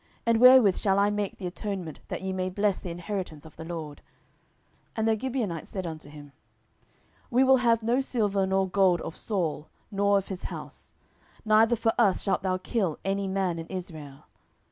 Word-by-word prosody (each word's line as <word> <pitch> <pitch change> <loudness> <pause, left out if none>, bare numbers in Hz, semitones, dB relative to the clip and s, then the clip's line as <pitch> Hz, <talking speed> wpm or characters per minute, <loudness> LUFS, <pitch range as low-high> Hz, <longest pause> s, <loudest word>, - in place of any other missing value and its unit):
and 230 -1 +3
wherewith 250 -6 +8
shall 195 -1 +1
I 200 +1 +3
make 205 -1 -3
the 190 - -7
atonement, 180 -3 -5
that - - -5
ye 190 0 -2
may 185 0 -2
bless 200 +1 0
the 180 - -7
inheritance 170 -3 -5
of 160 - -14
the - - -8
LORD? 160 -3 -6
10:021:004 - - -24 0.9
And 220 0 0
the 220 - +3
Gibeonites 235 - -3
said 190 -2 -4
unto 155 -3 -7
him, 145 -1 -12 1.0
We 250 +1 +4
will 265 0 +6
have 230 -2 +2
no 235 +3 +2
silver 205 -7 0
nor 190 0 +1
gold 185 -2 +3
of 165 - -6
Saul, 165 -8 -3 0.2
nor 200 0 +3
of 195 - -3
his 190 -2 -6
house; - - -8 0.5
neither 220 +2 +5
for 225 0 +1
us 205 -6 +3
shalt 195 - 0
thou 185 -1 0
kill 185 -4 -1
any 195 0 -1
man 190 -3 -1
in 165 - -7
Israel. 155 -6 -8
195 Hz, 190 wpm, -27 LUFS, 175-215 Hz, 1.0 s, wherewith